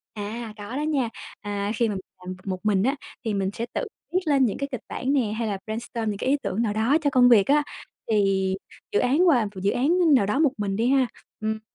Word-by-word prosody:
À, 215 +2 -5
có 205 +4 -7
đó 290 - -1
nha. 290 -6 0 0.3
À, 205 0 -2
khi 230 +1 +1
mà 205 - -2
mình 190 - -4 0.2
làm 185 0 -5
b - - -13
một 185 -1 -2
mình 200 -2 +3
á 265 +5 +2 0.3
thì 220 - 0
mình 195 -1 0
sẽ 230 - -3
tự - - -1 0.3
viết 370 - +4
lên 280 -4 +4
những 215 - -1
cái 280 0 -3
kịch 255 - -4
bản 265 +3 -2
nè, 280 - +4
hay 225 +1 -2
là 200 -2 -2
brainstorm 225 0 -3
những 205 - -3
cái 255 - -1
ý 285 - +4
tưởng 215 - -1
nào 220 -3 0
đó 225 +8 +3
cho 290 - +2
công 250 -2 +5
việc 215 -5 +6
á. 295 +1 +4 0.5
Thì 195 -2 +2 0.4
dự 420 - +2
án 295 +9 +3
và 250 -9 +4
m - - -4
dự 200 +2 +2
án, 250 +3 +1
a, 355 +2 +3
nào 245 - +3
đó 210 +8 0
một 305 -4 +4
mình 200 -2 -1
đi 230 +4 +1
ha, 265 -2 +4 0.3
ừm, 220 0 -2
225 Hz, 265 wpm, -25 LUFS, 205-270 Hz, 0.5 s, việc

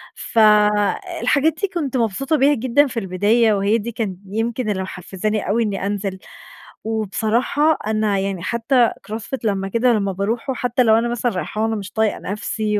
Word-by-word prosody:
فَالحاجات 215 - +2
دي 400 - +2
كنت 300 -9 -3
مبسوطة 240 +7 0
بيها 280 +2 +4
جدًا 260 +4 +2
في 245 -3 -3
البداية 210 +4 +2
وهي 200 +3 +2
دي 230 +1 -5
كان 215 -5 -3
يمكن 225 +3 -2
اللى 190 -2 -1
محفزاني 195 +3 -3
أوي 230 +3 +2
إنّي 200 -3 -2
أنزل. 200 -2 -3 0.6
وبصراحة 225 +8 +1
أنا 215 -2 +1
يعني 195 -2 -3
حتّى 235 +3 +2 0.2
cross 220 - -3
fit 265 - -4
لمّا 195 -3 -1
كده 235 +4 +2
لمّا 200 -2 0
باروحه 225 +7 -2
وحتّى 250 -1 0
لو 220 -2 +5
أنا 230 +1 +1
مثلًا 240 0 -1
رايحاة 210 +4 -3
وأنا 225 0 0
مش 200 -2 -6
طايقة 220 -1 0
نفسي 210 +1 -2
220 Hz, 170 wpm, -20 LUFS, 200-240 Hz, 0.6 s, لو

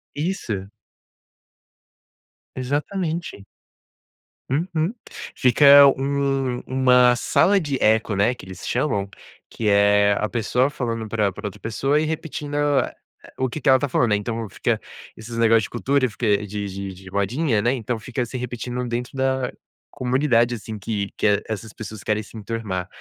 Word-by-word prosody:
Isso. 135 - -3 1.9
Exatamente. 150 - -3 1.0
Uhum, 165 - -1 0.4
fica 140 +3 +7
um 135 -2 0
uma 125 -1 +4
sala 195 +10 +3
de 145 -5 -2
eco, 110 -1 +3
né, 105 +6 +2
que - - -12
eles 95 -1 -9
chamam, 115 -7 0 0.4
que 110 - -3
é 100 0 +4
a 105 - -1
pessoa 125 +3 +1
falando 115 -6 -3
pra 105 -3 +1
pra 105 - -6
outra 100 - -9
pessoa 135 +7 0
e 155 - 0
repetindo 150 -2 -4
a 145 -1 +1 0.5
o 130 -1 +1
que 155 - -5
que - - -5
ela 130 0 +7
está 145 +1 -2
falando, 120 -2 +2
né. - - +5
Então 115 +2 -4
fica 95 - -1 0.4
esses 115 +1 -8
negócio 115 -1 +4
de - - -5
cultura, 130 +2 +1
fica 105 -2 0
de 105 0 -4
de 95 0 -6
de 95 0 -13
modinha, 110 - 0
né, 120 +4 +2
então 120 -1 -3
fica 125 +3 -3
se 125 +2 -6
repetindo 125 0 -4
dentro 120 +3 -4
da 130 -1 0 0.4
comunidade, 125 -2 +1
assim, 110 -1 -6
que 100 -1 -3
que 105 -1 +2
essas 110 0 -5
pessoas 110 -2 -8
querem 105 0 0
se 110 - -12
enturmar. 105 -4 -4
120 Hz, 155 wpm, -22 LUFS, 105-135 Hz, 1.9 s, fica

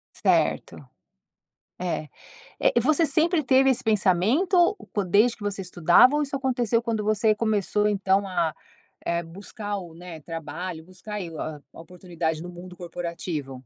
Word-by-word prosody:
Certo. - - +1 1.0
É. 175 -4 -3 0.5
Eh, - - +3
você 310 +5 +3
sempre 330 0 +2
teve 265 0 +4
esse 255 - 0
pensamento 225 - +3 0.2
po 205 - 0
desde 215 +6 +3
que 210 - -15
você 205 -1 -3
estudava, 175 - +5
ou 295 - +2
isso 275 -1 -3
aconteceu 245 -4 0
quando 225 -3 -2
você 215 +1 +2
começou 210 -1 0
então 195 -1 +1
a, 165 -4 -1 0.5
eh, 170 0 0
buscar 205 +4 -6
o, 170 -3 -10
né, 170 -2 -10
trabalho, 165 +2 -6
buscar 195 +3 -8
e 170 -3 -6
o 160 - -9
a 150 -2 -5
oportunidade 165 -2 -5
no 175 - -7
mundo 180 +1 -11
corporativo? 170 -5 -5
195 Hz, 150 wpm, -25 LUFS, 170-230 Hz, 1.0 s, estudava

